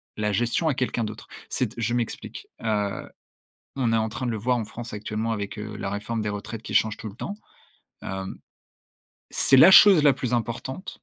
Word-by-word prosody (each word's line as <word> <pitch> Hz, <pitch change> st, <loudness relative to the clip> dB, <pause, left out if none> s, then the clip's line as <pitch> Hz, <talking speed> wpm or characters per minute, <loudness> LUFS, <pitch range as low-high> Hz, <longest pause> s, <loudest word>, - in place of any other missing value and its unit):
la 105 Hz, -1 st, -1 dB
gestion 120 Hz, -, 0 dB
à 155 Hz, -, +2 dB
quelqu'un 125 Hz, -2 st, -1 dB
d'autre. 105 Hz, 0 st, -7 dB, 0.2 s
C'est 125 Hz, -, -1 dB
t 110 Hz, -, -17 dB
je 115 Hz, 0 st, -1 dB
m'explique. 120 Hz, -2 st, -4 dB
Heu, 105 Hz, -3 st, -2 dB, 0.7 s
on 125 Hz, -4 st, +1 dB
est 115 Hz, -, +3 dB
en 110 Hz, 0 st, +1 dB
train 125 Hz, +4 st, -5 dB
de 120 Hz, -, -1 dB
le -, -, -2 dB
voir 125 Hz, +4 st, +1 dB
en 115 Hz, -, -2 dB
France 115 Hz, +2 st, -9 dB
actuellement 105 Hz, +2 st, -3 dB
avec, 100 Hz, -1 st, -4 dB
heu, 105 Hz, 0 st, -6 dB
la 100 Hz, -, -4 dB
réforme 105 Hz, +3 st, -3 dB
des 105 Hz, -, -2 dB
retraites 105 Hz, +2 st, -6 dB
qui -, -, -7 dB
change 110 Hz, -1 st, +3 dB
tout 110 Hz, -, -7 dB
le 100 Hz, -, -11 dB
temps. 200 Hz, -, -5 dB, 0.7 s
Hem. 95 Hz, 0 st, -5 dB, 0.9 s
C'est 135 Hz, -, +4 dB
la 165 Hz, +8 st, +9 dB
chose 190 Hz, -4 st, +8 dB
la 145 Hz, -2 st, +6 dB
plus 125 Hz, -2 st, -4 dB
importante. 120 Hz, -, -4 dB
115 Hz, 205 wpm, -25 LUFS, 105-125 Hz, 0.9 s, la